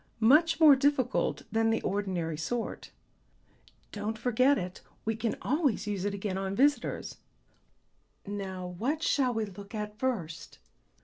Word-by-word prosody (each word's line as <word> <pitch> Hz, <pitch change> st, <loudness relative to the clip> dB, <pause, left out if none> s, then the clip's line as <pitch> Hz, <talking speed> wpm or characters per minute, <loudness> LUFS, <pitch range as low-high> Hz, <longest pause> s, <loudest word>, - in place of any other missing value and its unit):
"Much 305 Hz, +9 st, +5 dB
more 305 Hz, -4 st, +9 dB
difficult 265 Hz, -2 st, +1 dB
than 225 Hz, 0 st, +2 dB
the 225 Hz, -, +2 dB
ordinary 185 Hz, -5 st, -1 dB
sort." 225 Hz, +10 st, -4 dB, 1.0 s
"Don't 215 Hz, +2 st, -3 dB
forget 255 Hz, +4 st, +3 dB
it; 180 Hz, -1 st, -5 dB, 0.2 s
we 225 Hz, 0 st, 0 dB
can 225 Hz, 0 st, -1 dB
always 275 Hz, -, +1 dB
use 200 Hz, -2 st, -2 dB
it 205 Hz, -, -1 dB
again 195 Hz, -1 st, -3 dB
on 195 Hz, 0 st, -3 dB
visitors. 285 Hz, +5 st, +1 dB, 1.1 s
Now 195 Hz, -3 st, -5 dB
what 245 Hz, -, -2 dB
shall 260 Hz, -3 st, +2 dB
we 220 Hz, -1 st, 0 dB
look 200 Hz, +2 st, -10 dB
at 210 Hz, 0 st, -5 dB
first?" 195 Hz, -12 st, -3 dB
220 Hz, 135 wpm, -30 LUFS, 195-255 Hz, 1.1 s, more